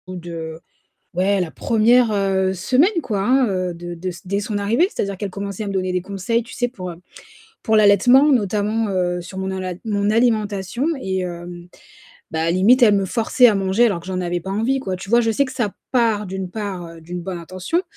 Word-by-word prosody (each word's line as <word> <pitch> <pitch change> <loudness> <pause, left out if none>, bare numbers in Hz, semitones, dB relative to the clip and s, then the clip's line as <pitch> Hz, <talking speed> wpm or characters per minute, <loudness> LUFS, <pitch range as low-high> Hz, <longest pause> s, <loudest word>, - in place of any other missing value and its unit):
Ou 185 - -7
de 165 -2 -7 0.5
ouais, 190 +3 +1
la 170 -3 -3
1re, 235 +1 +3
heu, 190 -2 +1
semaine, 255 - +2
quoi, 210 -5 -2
hein, 255 +5 +3 0.3
de 175 +1 -7
de 180 +2 -4 0.2
dès 200 +2 -1
son 210 0 -3
arrivée. 225 - +2
C'est-à-dire 200 -1 -3
qu'elle 205 +1 -4
commençait 200 +2 -5
à - - -5
me 200 - -3
donner 185 -1 -1
des 180 0 -1
conseils, 200 +5 -1
tu 245 - -12
sais, 245 - 0
pour, 185 -7 -7
heu, - - -9 0.7
pour 220 - +2
l'allaitement, 220 +8 +6
notamment, 215 -1 +1
heu, 180 -2 0
sur 185 +2 -10
mon 190 0 -3
alom 185 -2 -4
mon 205 -2 0
alimentation, 215 0 0 0.2
et 190 -3 -2
hem, 175 0 -7 0.6
ben 160 0 0
limite, 220 +9 +4
elle 215 -3 +7
me 195 - +1
forçait 230 +5 +3
à 220 - +2
manger, 195 +4 +2
alors 195 -7 -1
que 170 - -15
j'en 185 -1 -3
avais 175 0 -2
pas 190 - -7
envie, 230 +7 0
quoi. 190 -7 -3
Tu 190 +1 -10
vois? 235 +1 +5
Je 225 -1 +1
sais 250 +6 +2
que 260 - -7
ça 235 -6 -2 0.2
part 225 -4 +2
d'une 190 -1 -5
part 180 -5 -6
d'une 175 +2 -6
bonne 180 0 -5
intention 185 - -2
200 Hz, 210 wpm, -20 LUFS, 185-225 Hz, 0.7 s, elle